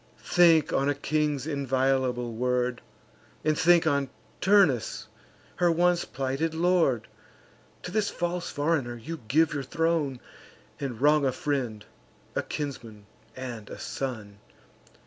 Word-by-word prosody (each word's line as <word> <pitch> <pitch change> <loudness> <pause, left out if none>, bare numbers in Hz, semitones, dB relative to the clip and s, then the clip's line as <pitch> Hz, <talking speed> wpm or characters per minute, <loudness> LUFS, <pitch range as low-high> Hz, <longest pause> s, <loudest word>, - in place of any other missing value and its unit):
Think 165 -4 +4
on 140 +1 +2
a 145 - +1
king's 150 -1 -1
inviolable 130 -4 0
word; 125 +1 0 0.6
And 155 -1 +3
think 175 +1 +4
on 140 -3 +1 0.3
Turnus, 190 - +3 0.5
her 175 -1 +3
once 175 +1 +2
plighted 135 +5 -2
lord: 165 - +2 0.8
To 180 - -6
this 210 0 +1
false 175 0 -3
foreigner 145 -5 -1
you 160 +8 -7
give 155 +6 +3
your 145 - -2
throne, 155 -1 0 0.6
And 130 -5 -4
wrong 150 +1 +4
a 135 - +2
friend, 125 -6 -3 0.5
a - - +1
kinsman, 115 -8 -6 0.3
and 120 -5 -7
a - - -8
son. 110 -7 -5
140 Hz, 125 wpm, -27 LUFS, 125-165 Hz, 0.8 s, Think